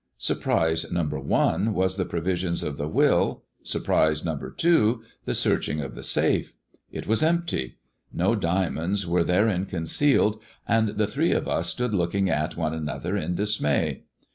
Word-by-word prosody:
Surprise 80 Hz, 0 st, 0 dB
number 75 Hz, -4 st, -1 dB
one 105 Hz, +9 st, +1 dB
was 95 Hz, 0 st, +1 dB
the 95 Hz, -2 st, -1 dB
provisions 85 Hz, +1 st, -1 dB
of 75 Hz, -, -3 dB
the 75 Hz, -, -3 dB
will, 80 Hz, -, +2 dB, 0.2 s
surprise 80 Hz, 0 st, +1 dB
number 80 Hz, -4 st, -3 dB
two, 120 Hz, -9 st, +2 dB, 0.2 s
the -, -, -1 dB
searching 75 Hz, -, +1 dB
of 70 Hz, -3 st, -5 dB
the -, -, -9 dB
safe. -, -, 0 dB, 0.4 s
It -, -, -6 dB
was 110 Hz, +1 st, +3 dB
empty: 165 Hz, -, 0 dB, 0.3 s
no -, -, +1 dB
diamonds 90 Hz, +2 st, 0 dB
were 85 Hz, 0 st, +2 dB
therein 95 Hz, +1 st, +1 dB
concealed, 105 Hz, -, +1 dB, 0.3 s
and 115 Hz, -1 st, +3 dB
the 105 Hz, -, +3 dB
thre^ 105 Hz, -, +1 dB
of -, -, -3 dB
us -, -, -1 dB
stood 125 Hz, -3 st, -2 dB
looking 95 Hz, +1 st, +1 dB
at 75 Hz, +2 st, -1 dB
one 80 Hz, -2 st, -1 dB
another 75 Hz, -2 st, -3 dB
in 85 Hz, +3 st, -2 dB
dismay. 105 Hz, -8 st, 0 dB
90 Hz, 155 wpm, -25 LUFS, 80-105 Hz, 0.4 s, was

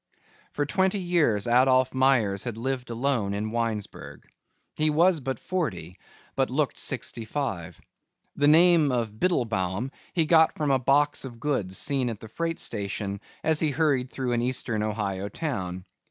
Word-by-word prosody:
For 145 Hz, -, -1 dB
twenty 190 Hz, +6 st, +1 dB
years 170 Hz, -, +1 dB
Adolph 130 Hz, +1 st, +3 dB
Myers 125 Hz, -7 st, +2 dB
had 120 Hz, -3 st, -4 dB
lived 125 Hz, +1 st, -3 dB
alone 115 Hz, -4 st, -1 dB
in 110 Hz, +1 st, -3 dB
Winesburg. 115 Hz, -3 st, -4 dB, 0.5 s
He 155 Hz, 0 st, +2 dB
was 170 Hz, +3 st, +3 dB
but 130 Hz, -2 st, -3 dB
forty 95 Hz, -, -4 dB, 0.4 s
but -, -, +1 dB
looked -, -, -1 dB
sixty 115 Hz, -, -2 dB
five. 100 Hz, -, -4 dB, 0.6 s
The 145 Hz, -, +2 dB
name 160 Hz, -1 st, +5 dB
of 120 Hz, -3 st, -1 dB
Biddlebaum 115 Hz, -, 0 dB, 0.2 s
he 165 Hz, -3 st, +2 dB
got 160 Hz, 0 st, +4 dB
from 150 Hz, -2 st, 0 dB
a 135 Hz, -, +3 dB
box 145 Hz, +3 st, +2 dB
of 120 Hz, -3 st, -8 dB
goods 105 Hz, -10 st, -1 dB
seen 135 Hz, -3 st, 0 dB
at 115 Hz, -2 st, -7 dB
a -, -, -7 dB
freight 165 Hz, +7 st, -3 dB
station 100 Hz, 0 st, -3 dB, 0.2 s
as 160 Hz, -1 st, +2 dB
he 155 Hz, -, +2 dB
hurried 140 Hz, -3 st, +1 dB
through 130 Hz, -2 st, -3 dB
an 120 Hz, -1 st, +1 dB
eastern 120 Hz, -3 st, -1 dB
Ohio 100 Hz, -2 st, -2 dB
town. 95 Hz, -, -4 dB
125 Hz, 155 wpm, -26 LUFS, 105-150 Hz, 0.6 s, name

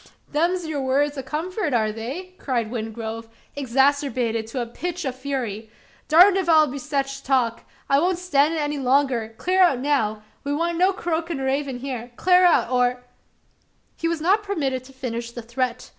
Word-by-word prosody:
"Them's 345 Hz, +3 st, +1 dB
yur 310 Hz, -2 st, -3 dB
words 280 Hz, +2 st, +1 dB
o' 270 Hz, -, -3 dB
comfort, 320 Hz, -, -3 dB
air 215 Hz, -2 st, +2 dB
they?" 270 Hz, -, -6 dB
cried 235 Hz, -5 st, -2 dB
Wingrove, 225 Hz, -1 st, -5 dB, 0.3 s
exasperated 265 Hz, -4 st, +1 dB
to 240 Hz, +3 st, -4 dB
a 240 Hz, -, -1 dB
pitch 350 Hz, +8 st, -5 dB
of 260 Hz, -2 st, -2 dB
fury. 250 Hz, -6 st, -4 dB, 0.4 s
"Durned 360 Hz, +5 st, +7 dB
if 375 Hz, -3 st, -1 dB
I'll 315 Hz, -2 st, +7 dB
bar 280 Hz, 0 st, -5 dB
sech 275 Hz, 0 st, -1 dB, 0.2 s
talk! 250 Hz, -4 st, 0 dB, 0.2 s
I 275 Hz, -, +4 dB
won't 360 Hz, +3 st, +1 dB
stan' 310 Hz, -4 st, +2 dB
it 325 Hz, -, -1 dB
any 295 Hz, -1 st, -2 dB
longer. 255 Hz, -4 st, +1 dB
Clar 370 Hz, +1 st, 0 dB
out 350 Hz, -8 st, +5 dB
now! 225 Hz, -7 st, 0 dB, 0.2 s
We 285 Hz, 0 st, -1 dB
want 335 Hz, +2 st, -1 dB
no 370 Hz, +2 st, +5 dB
croakin' 335 Hz, -5 st, -2 dB
raven 270 Hz, -1 st, -2 dB
hyar. 250 Hz, -3 st, -5 dB
Clar 365 Hz, +4 st, +4 dB
out! 330 Hz, -8 st, +3 dB
or 250 Hz, 0 st, +1 dB, 0.5 s
" -, -, -42 dB
He 330 Hz, -, -2 dB
was 335 Hz, -2 st, -1 dB
not 385 Hz, +6 st, +3 dB
permitted 280 Hz, -11 st, -2 dB
to 270 Hz, -, -14 dB
finish 240 Hz, -3 st, -5 dB
the 240 Hz, -, -7 dB
threat. 250 Hz, +1 st, -3 dB
275 Hz, 180 wpm, -23 LUFS, 245-330 Hz, 0.5 s, Durned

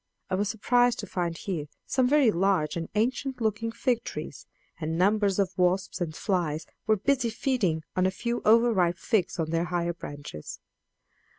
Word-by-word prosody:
I -, -, 0 dB
was 200 Hz, +2 st, +1 dB
surprised 245 Hz, +2 st, +2 dB
to -, -, -6 dB
find 170 Hz, -2 st, -2 dB
here 165 Hz, -6 st, -4 dB, 0.2 s
some 260 Hz, -2 st, +2 dB
very 280 Hz, -5 st, +5 dB
large 185 Hz, -4 st, +1 dB
and 165 Hz, -1 st, -4 dB
ancient 255 Hz, +4 st, 0 dB
looking 225 Hz, 0 st, -1 dB
fig 235 Hz, 0 st, 0 dB
trees, -, -, -7 dB, 0.3 s
and 160 Hz, 0 st, -2 dB
numbers 200 Hz, +1 st, +3 dB
of 195 Hz, -2 st, 0 dB
wasps 185 Hz, +1 st, +1 dB
and 160 Hz, -3 st, -2 dB
flies 165 Hz, -6 st, -1 dB, 0.2 s
were 215 Hz, -1 st, +4 dB
busy 250 Hz, +3 st, +1 dB
feeding 215 Hz, -, 0 dB
on 185 Hz, 0 st, +3 dB
a -, -, +2 dB
few 235 Hz, +5 st, -3 dB
over 230 Hz, +2 st, +5 dB
ripe 175 Hz, -3 st, +2 dB
figs 200 Hz, -1 st, 0 dB
on 160 Hz, -2 st, -2 dB
the 165 Hz, +1 st, +1 dB
higher 175 Hz, 0 st, -1 dB
branches. 145 Hz, -, -8 dB
195 Hz, 175 wpm, -27 LUFS, 170-230 Hz, 0.3 s, very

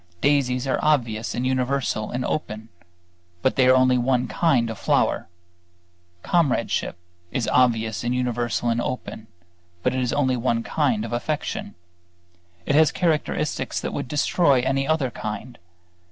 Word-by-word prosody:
Daisies 130 Hz, 0 st, +1 dB
are 135 Hz, -, 0 dB
obvious 120 Hz, -8 st, +1 dB
and 125 Hz, -, -2 dB
universal 130 Hz, -4 st, -1 dB
and 125 Hz, +1 st, -3 dB
open; 110 Hz, -6 st, -4 dB, 0.7 s
but 130 Hz, -, +2 dB
they 130 Hz, -1 st, +4 dB
are 130 Hz, -, +6 dB
only 130 Hz, -1 st, +4 dB
one 125 Hz, 0 st, +1 dB
kind 125 Hz, -9 st, +1 dB
of 110 Hz, -, -8 dB
flower. -, -, +1 dB, 1.0 s
Comradeship 155 Hz, -, 0 dB, 0.3 s
is 120 Hz, -, -1 dB
obvious 115 Hz, -4 st, +2 dB
and 120 Hz, +1 st, 0 dB
universal 120 Hz, -2 st, -1 dB
and 115 Hz, 0 st, +1 dB
open; 110 Hz, -3 st, -5 dB, 0.6 s
but -, -, +1 dB
it 130 Hz, -, -1 dB
is 125 Hz, -, 0 dB
only 130 Hz, -3 st, +1 dB
one 115 Hz, -1 st, 0 dB
kind 125 Hz, -9 st, 0 dB
of 115 Hz, -, -6 dB
affection; 120 Hz, -4 st, -3 dB, 0.9 s
it -, -, 0 dB
has 155 Hz, +1 st, +5 dB
characteristics 165 Hz, -5 st, -1 dB
that -, -, -4 dB
would -, -, -3 dB
destroy 145 Hz, 0 st, +2 dB
any 135 Hz, +2 st, 0 dB
other 155 Hz, -6 st, +1 dB
kind. 110 Hz, +3 st, -6 dB
125 Hz, 145 wpm, -23 LUFS, 120-140 Hz, 1.0 s, are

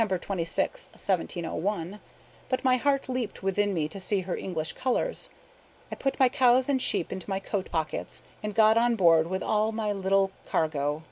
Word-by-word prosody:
26, 185 Hz, -4 st, -1 dB
1701; 185 Hz, +1 st, -2 dB, 0.5 s
but 255 Hz, -, -1 dB
my 255 Hz, -1 st, +4 dB
heart 275 Hz, +1 st, +1 dB
leaped 255 Hz, -6 st, -3 dB
within 205 Hz, +2 st, +1 dB
me 160 Hz, -5 st, 0 dB
to 180 Hz, +6 st, -8 dB
see 195 Hz, +1 st, 0 dB
her 180 Hz, 0 st, -3 dB
English 160 Hz, -4 st, -3 dB
colors. -, -, -1 dB, 0.6 s
I -, -, -3 dB
put 270 Hz, -, -2 dB
my 260 Hz, -, +7 dB
cows 255 Hz, 0 st, +4 dB
and 270 Hz, -2 st, +1 dB
sheep 170 Hz, -, 0 dB
into 190 Hz, +1 st, -7 dB
my 190 Hz, 0 st, -1 dB
coat 195 Hz, -1 st, -3 dB
pockets, 160 Hz, -2 st, -3 dB, 0.2 s
and 210 Hz, -1 st, -4 dB
got 220 Hz, 0 st, +6 dB
on 240 Hz, 0 st, +3 dB
board 165 Hz, -5 st, +5 dB
with 190 Hz, +2 st, -2 dB
all 215 Hz, +1 st, +1 dB
my 220 Hz, -1 st, -1 dB
little 195 Hz, 0 st, +1 dB, 0.2 s
cargo. 150 Hz, -1 st, 0 dB
200 Hz, 175 wpm, -27 LUFS, 175-235 Hz, 0.6 s, my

